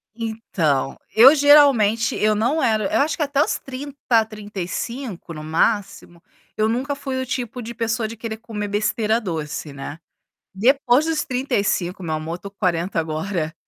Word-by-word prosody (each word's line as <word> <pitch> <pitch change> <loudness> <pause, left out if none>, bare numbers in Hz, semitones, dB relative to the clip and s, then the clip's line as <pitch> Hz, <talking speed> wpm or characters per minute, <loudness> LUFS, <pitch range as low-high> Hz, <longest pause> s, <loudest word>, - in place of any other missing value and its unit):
Então, 195 - -1 0.2
eu 250 +6 +9
geralmente 275 -7 +5
eu 215 0 +2
não 250 +9 +1
era 215 -2 +1
eu - - +3
acho 305 +3 +1
que 310 - -1
até 285 0 +1
os - - +1
30, 265 -4 -1
35 210 0 -6
no 155 - -7
máximo, 175 +1 -1 0.4
eu 215 - +2
nunca 260 +5 -1
fui 265 -2 -4
o - - -3
tipo 250 -1 -4
de 235 +1 -7
pessoa 225 -1 -1
de 230 - -9
querer 220 0 -5
comer 215 -2 -5
besteira 215 +2 0
doce, 155 -5 -4
né. 140 +3 -8 0.5
Depois 250 +6 +3
dos 320 -2 0
35, 205 -8 -1
meu 160 -2 -2
amor, 155 +2 -4
eu 175 - -6
tô 200 - -8
com 200 - -43
40 175 -2 0
agora, 160 +1 -2
220 Hz, 165 wpm, -21 LUFS, 185-255 Hz, 0.5 s, eu